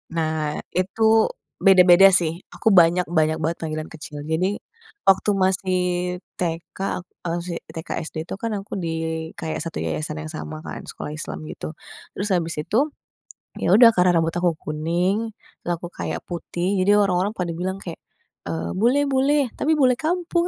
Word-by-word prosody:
Nah, 155 -2 -1 0.2
itu 195 +5 -1 0.6
beda-beda 185 -1 +8
sih, 160 -2 -1 0.2
aku - - -4
banyak 175 -1 +6
banyak 155 0 +3
banget 165 +1 0
panggilan 155 -1 -4
kecil. 150 -2 -8
Jadi, 180 +6 0 0.5
waktu 195 +2 +4
masih 185 0 +1 0.6
TK, 165 -1 -3 0.5
a - - -1
masih 175 0 -4 0.2
TK 160 - -7 0.2
SD - - -13
itu, - - -7
kan 230 -1 -2
aku 195 0 -5
di 165 - -2 0.5
kayak 160 - -3
satu 165 - -6
yayasan 155 0 -3
yang 155 - -7
sama 155 0 -7
kan, - - -6
sekolah 150 - -6
Islam 155 0 -6
gitu, 155 - -7 0.4
terus 205 +2 -2
habis 170 -3 0
itu, 210 +8 -1 0.8
ya - - 0
udah 235 0 +9
karena 180 0 +4
rambut 165 +1 -1
aku 175 -1 +2
kuning, 175 +8 -1 0.3
terus 175 - -2
aku 175 - -6
kayak - - -3
putih 175 0 -3 0.2
jadi 200 - +4
orang-orang 195 0 +2
pada 180 -5 -3
bilang 185 +2 -3
kayak, 170 -4 -8 0.5
eee, 80 +1 -3
"Bule 240 +8 +3
bule, 275 +1 +2
tapi 310 - 0
bule 255 -2 +5
kampung, 345 +3 0
175 Hz, 160 wpm, -23 LUFS, 160-200 Hz, 0.8 s, udah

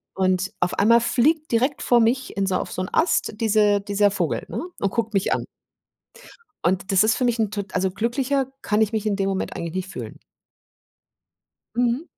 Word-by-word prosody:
Und 185 0 +1
auf 175 - +1
einmal 230 +3 +5
fliegt 305 +6 +1
direkt 255 +5 +1
vor 240 -1 +4
mich 245 0 0
in 195 - +1
so 185 - 0
auf - - -5
so 185 - -3
'n 185 - -5
Ast 330 -8 +1
diese 210 -2 +3
dieser 205 0 +2
Vogel, - - -2
ne? - - -4 0.2
Und 200 0 0
guckt 225 -1 -2
mich 195 - +2
an. - - -2 1.2
Und 190 +3 0
das 195 +1 +5
ist 220 +1 +2
für 255 - -1
mich 240 -1 +1
'n 210 -2 +1
tot 200 -2 -6
also 185 0 +1
glücklicher 255 +6 -1 0.2
kann 210 +1 +1
ich 220 0 +2
mich 220 -1 -1
in 200 -2 +1
dem 195 -1 0
Moment 195 -1 -3
eigentlich 170 0 -5
nicht 185 0 -3
fühlen. - - -8 1.6
Mhm. 245 +5 +1
210 Hz, 195 wpm, -23 LUFS, 195-240 Hz, 1.6 s, einmal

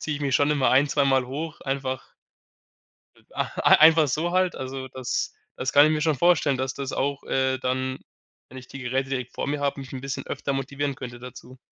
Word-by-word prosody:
ziehe 150 -2 -3
ich 145 - -9
mich 135 -2 0
schon 145 +2 +3
immer 145 -3 +2
ein 135 +3 +4
zweimal 135 -3 +2
hoch. 150 +5 -6
Einfach 135 -1 -4 1.0
e - - -24 0.4
einfach 160 0 +7
so 160 +6 -1
halt. 185 -1 +1
Also 130 0 -6
das 130 -1 -3 0.2
das 130 - -3
kann 145 +1 +8
ich - - +1
mir 155 -1 0
schon 160 0 +2
vorstellen, 155 -3 +3
dass 130 0 -2
das 140 -1 -4
auch, 140 0 -2
äh, 130 0 0
dann, 130 0 -2 0.5
wenn 130 - -11
ich 125 - -15
die 135 - -9
Geräte 130 +1 -2
direkt 130 -2 -4
vor - - -4
mir 145 0 -1
habe, 140 -1 -1
mich 135 -1 -8
'n 130 - -6
bisschen 135 +1 -5
öfter 140 - -3
motivieren 140 +1 -2
könnte 125 -3 -8
dazu. 125 +1 -11
135 Hz, 210 wpm, -25 LUFS, 130-145 Hz, 1.0 s, kann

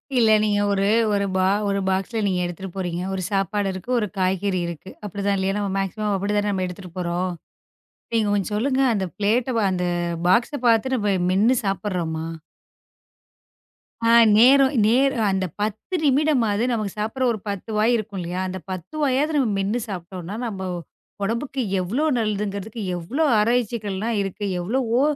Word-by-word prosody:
இல்ல, 230 -3 +4
நீங்க 205 -1 +2
ஒரு 195 0 +1 0.3
ஒரு 200 0 +1 0.4
ஒரு 200 0 0
பாக்ஸ்ல 195 +4 -1
நீங்க 185 -2 0
எடுத்துட்டு 175 +2 -6
போறீங்க. 180 -2 -3
ஒரு 190 - -2
சாப்பாடு 195 0 0
இருக்கு, 185 +6 -9
ஒரு 210 - -1
காய்கறி 185 0 0
இருக்கு. 170 +2 -8
அப்படிதான் 200 0 -1
இல்லையா? 190 +1 0
நம்ம 200 -2 -2
மேக்சிமம் 205 +2 -2
அப்படிதானே 205 +1 0
நாம 190 -1 -1
எடுத்துட்டு 180 0 -9
போறோம். 180 +1 -1 0.8
நீங்கக் 215 -3 +2
கொஞ்சம் 205 +1 -1
சொல்லுங்க 265 +4 +1
அந்த 195 -3 -1
ப்ளேட்ட 230 +4 +1 0.2
அந்த 180 -1 -1 0.4
பாக்ஸ 240 +8 +2
பாத்து 235 +3 +3
நம்ம 205 -4 +1 0.2
மென்னு 220 +7 +4
சாப்பட்றோமா? 180 -5 -2 1.8
அ, - - +4 0.3
நேரம் 265 +3 +6
நேர் 270 +4 +3 0.2
அந்தப் 190 -4 -2
10 215 - -3
நிமிடமாது 260 -7 +2
நமக்குச் 215 -3 -2
சாப்பிடுற 225 +5 -2
ஒரு 215 - -3
10 200 +2 -5
வாய் 225 +3 +3
இருக்கும் 210 -3 -4
இல்லையா? 175 +2 -3
அந்தப் 185 0 -7
10 185 - -7
வாயாவது 290 +3 +1
நம்ம 265 - +2
மென்னு 205 +5 0
சாப்பிட்டோம்னா 185 0 -6
நம்ம 200 -4 -5 0.6
உடம்புக்கு 235 +6 -2 0.2
எவ்வளவு 260 - 0
நல்லதுங்குறதுக்கு 210 0 -2 0.2
எவ்வளவு 270 - 0
ஆராய்ச்சிகள் 225 -3 0
எல்லாம் 220 +3 -1
இருக்கு. 195 +1 -4 0.2
எவ்வளவோ 235 +5 0
205 Hz, 150 wpm, -23 LUFS, 190-235 Hz, 1.8 s, நேரம்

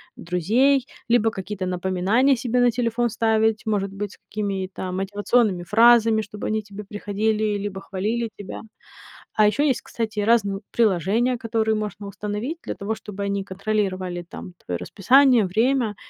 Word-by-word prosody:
друзей, 235 - +2 0.2
либо 225 -2 +3
какие-то 190 -1 -5
напоминания 190 +9 +2
себе 245 +1 0
на 245 -1 +4
телефон 240 0 0
ставить, 220 0 +1
может 200 -3 -1
быть, 200 0 -5
с - - -18
какими-то 190 -3 -3
мотивационными 205 0 +1
фразами, 225 +2 +5
чтобы 210 0 -6
они 220 0 0
тебе 205 0 -10
приходили, 210 +1 -1
либо 195 -1 -5
хвалили 220 +5 -2
тебя. 200 -2 -7 0.7
А 215 -1 +5
ещё 250 +8 +2
есть, 270 -5 +1
кстати, 220 -2 -4
разные 205 -2 +2
приложения, 220 +4 +2
которые 225 -1 0
можно 210 -1 -4
установить 210 - -4
для - - -4
того, 205 +3 -3
чтобы 205 -2 -7
они 200 0 -2
контролировали, 190 -3 -2
там, 180 - -9
твоё 90 -1 -2
расписание, 250 - +4
время 225 +2 +1
210 Hz, 145 wpm, -23 LUFS, 195-230 Hz, 0.7 s, фразами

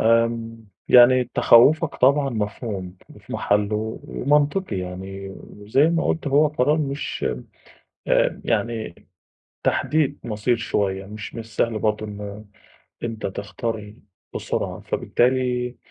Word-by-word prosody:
آمم. 115 0 +1 0.2
يعني 125 +1 +7
تخوَّفك 145 +7 +5
طبعًا 140 +1 +3
مفهوم 105 -4 -4
وفي - - -13
محلُّه 105 +2 0
ومنطقي 145 - +1
يعني، 95 +2 -6
وزي 105 +7 -1
ما 165 0 +1
قُلت 160 - -1
هو 145 +3 +4
قرار 150 +1 +1
مش 140 -1 -3 0.8
آآ، - - +2
يعني 115 -6 -1 0.7
تحديد 150 -2 +1
مَصير 110 +2 0
شوية، 95 -4 -1
مش 105 +1 -8
من 115 - -5
السهل 115 0 -2
برضه 110 0 0
إن، 105 0 -8 0.6
أنت 115 -2 -4
تختار 105 +2 -5 0.4
بسرعة، - - -3
فبالتالي 125 0 0
115 Hz, 110 wpm, -23 LUFS, 105-130 Hz, 0.8 s, يعني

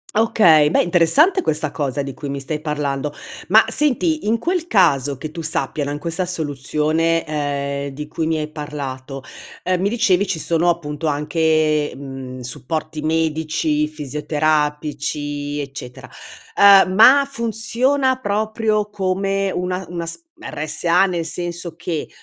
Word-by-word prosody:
Okay, 175 -9 +5
beh - - +3
interessante 180 - +4
questa 155 - -1
cosa 140 -2 -2
di 135 -1 -5
cui 145 - -7
mi 140 0 -4
stai 150 +3 -3
parlando. 145 -2 -2 0.3
Ma 220 +4 +6
senti, 300 +3 +1
in 225 +2 +2
quel 350 +2 -1
caso, 145 - +3
che 155 +3 -7
tu 165 +1 -6
sappia, 155 -2 -2
no, 145 - -3
in 145 - -4
questa 170 +3 -2
soluzione, 160 0 0
ehm, 140 -2 -2
di 150 +2 -7
cui 160 +1 -2
mi 160 0 0
hai 150 0 -4
parlato, 140 -3 -6 0.4
ehm, 185 0 0
mi 190 - +1
dicevi 205 -4 +2
ci 185 - -1
sono 165 +2 0
appunto 160 -2 -2
anche, 155 0 +1
mhmm, 135 -2 -8
supporti 150 +5 -4
medici, 155 -1 0
fisioterapici, 150 -1 -2
eccetera. 135 -3 -9 0.5
Ehm, 200 -2 +7
ma 260 +8 +7
funziona 255 +3 0
proprio 215 -1 -1
come 195 0 -1
una 180 +1 -3
una 170 -1 -5
s 165 - -7 0.2
RSA 170 - +1
nel 175 -3 -2
senso 170 0 -5
che, 165 -3 -4
160 Hz, 140 wpm, -20 LUFS, 145-190 Hz, 0.5 s, Ehm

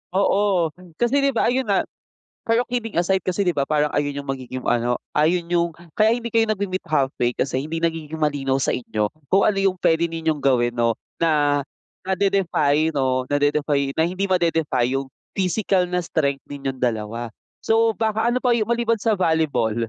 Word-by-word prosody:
Oo, 195 -4 +2 0.3
kasi 240 +4 +2
'di 275 - +3
ba - - +2
ayun 255 0 0
nga 200 - +2 0.6
pero 230 +2 +2
kidding 230 -5 -3
aside 185 +2 +2
kasi 185 +2 -1
'di 175 - +2
ba 140 -1 0
parang 150 -1 0
ayun 145 -1 -1
yung 140 - -13
magiging 130 -1 -5
ano, 120 0 +1 0.2
ayun 170 +3 +2
yung 170 -1 +2 0.2
kaya 220 +1 +4
hindi 235 -1 -6
kayo 225 -1 +3
nagme-meet 195 -2 -2
halfway 135 -5 +1
kasi 130 0 -1
hindi 165 +1 -4
nagiging 160 -1 -2
malinaw 145 -3 0
sa 135 - 0
inyo 105 -4 -2 0.2
kung 195 +1 +4
ano 210 -2 +2
yung 195 -1 +1
puwede 165 -1 +2
ninyong 160 -2 -2
gawin 120 -3 +2
'no, 115 -1 +1 0.2
na 145 -3 +2 0.4
nade-defy 185 -6 +1
'no, 130 -2 0
nade-defy 145 -1 +1
na 160 - +2
hindi 185 +3 -2
made-defy 165 -9 +1
yung 135 0 -5 0.3
physical 190 0 +1
na 180 0 0
strength 140 -4 -1
ninyong 135 -2 -4
dalawa 115 0 -2 0.3
so 225 0 +3
baka 220 +1 -1
ano 250 - +1
pa 245 -2 +3
yung 225 -1 -1
maliban 235 -1 +1
sa 220 +1 +1
volleyball? 155 -11 +1
160 Hz, 175 wpm, -22 LUFS, 140-195 Hz, 0.6 s, kaya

